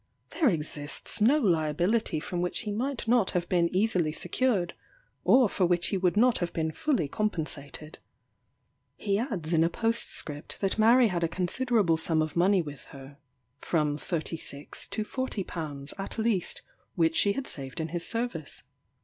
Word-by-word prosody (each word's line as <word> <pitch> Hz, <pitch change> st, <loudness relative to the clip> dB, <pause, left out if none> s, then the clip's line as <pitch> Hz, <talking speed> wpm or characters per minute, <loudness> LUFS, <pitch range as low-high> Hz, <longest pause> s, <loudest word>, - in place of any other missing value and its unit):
There 305 Hz, -6 st, +3 dB
exists 150 Hz, +1 st, -2 dB
no 255 Hz, +8 st, +5 dB
liability 175 Hz, -, +1 dB
from 175 Hz, +3 st, -3 dB
which 180 Hz, -, -1 dB
he 215 Hz, -3 st, -4 dB
might 240 Hz, +3 st, -3 dB
not 235 Hz, -4 st, +3 dB
have 175 Hz, 0 st, -2 dB
been 170 Hz, -2 st, +2 dB
easily 185 Hz, -5 st, +1 dB
secured, 180 Hz, +2 st, 0 dB, 0.5 s
or 255 Hz, -2 st, +6 dB
for 185 Hz, -2 st, +1 dB
which 175 Hz, 0 st, +1 dB
he 195 Hz, -, 0 dB
would 185 Hz, +1 st, +1 dB
not 245 Hz, +2 st, +4 dB
have 175 Hz, -1 st, -2 dB
been 160 Hz, -1 st, -1 dB
fully 195 Hz, -, 0 dB
compensated. 155 Hz, -5 st, -3 dB, 1.0 s
He 200 Hz, -1 st, 0 dB
adds 190 Hz, -, -3 dB
in 160 Hz, -1 st, +4 dB
a 165 Hz, -, +2 dB
postscript 200 Hz, -9 st, -1 dB
that 195 Hz, +2 st, -1 dB
Mary 230 Hz, +2 st, +6 dB
had 175 Hz, -2 st, -1 dB
a -, -, +3 dB
considerable 185 Hz, 0 st, +1 dB
sum 160 Hz, -1 st, +2 dB
of 155 Hz, -1 st, -5 dB
money 185 Hz, +1 st, +3 dB
with 145 Hz, -2 st, -9 dB
her, 140 Hz, +1 st, -13 dB, 0.4 s
from 150 Hz, -3 st, 0 dB
£36 155 Hz, -4 st, -5 dB
to 215 Hz, -, -2 dB
£40 165 Hz, -, -4 dB
at 195 Hz, -, -5 dB
least, 220 Hz, -5 st, 0 dB, 0.3 s
which 165 Hz, -2 st, +2 dB
she 200 Hz, +5 st, +3 dB
had 270 Hz, +5 st, -4 dB
saved 135 Hz, 0 st, -5 dB
in 160 Hz, 0 st, -2 dB
his 170 Hz, +1 st, -2 dB
service. 230 Hz, -, -2 dB
175 Hz, 160 wpm, -28 LUFS, 160-220 Hz, 1.0 s, or